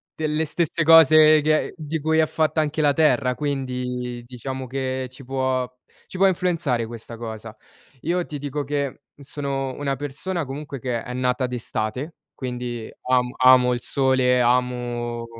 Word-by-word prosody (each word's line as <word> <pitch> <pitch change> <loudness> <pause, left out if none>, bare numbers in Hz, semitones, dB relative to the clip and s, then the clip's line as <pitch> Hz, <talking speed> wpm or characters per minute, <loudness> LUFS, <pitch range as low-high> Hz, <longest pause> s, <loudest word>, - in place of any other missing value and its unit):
delle 155 0 -1
stesse 165 +2 0
cose 155 -1 +7
che 155 +1 +1
di 160 0 -4
cui 160 +2 +1
è 160 - +5
fatta 155 0 +1
anche 155 +1 -1
la 145 -1 +4
terra, 140 -5 +2
quindi 125 -4 -3
diciamo 130 +2 -6
che 130 0 -3
ci 135 +1 -12
può 130 -1 -1 0.4
ci 185 - -8
può 195 - +4
influenzare 165 -10 0
questa 115 0 -9
cosa. 110 -1 -7 0.5
Io 175 +2 -1
ti 150 - -6
dico 145 +1 -3
che, 140 -1 -3
mhmm, 145 - -15
sono 135 -1 -3
una 140 -1 -2
persona 145 +5 -4
comunque 140 +1 -7
che 120 -2 -3
è 125 -2 -6
nata 125 0 0
d'estate, 125 +4 -3 0.2
quindi 125 -3 -5
amo 125 0 +1
amo 130 -1 +6
il 120 - -2
sole, 130 -2 +2
amo 120 -1 0
130 Hz, 155 wpm, -23 LUFS, 125-150 Hz, 0.5 s, cose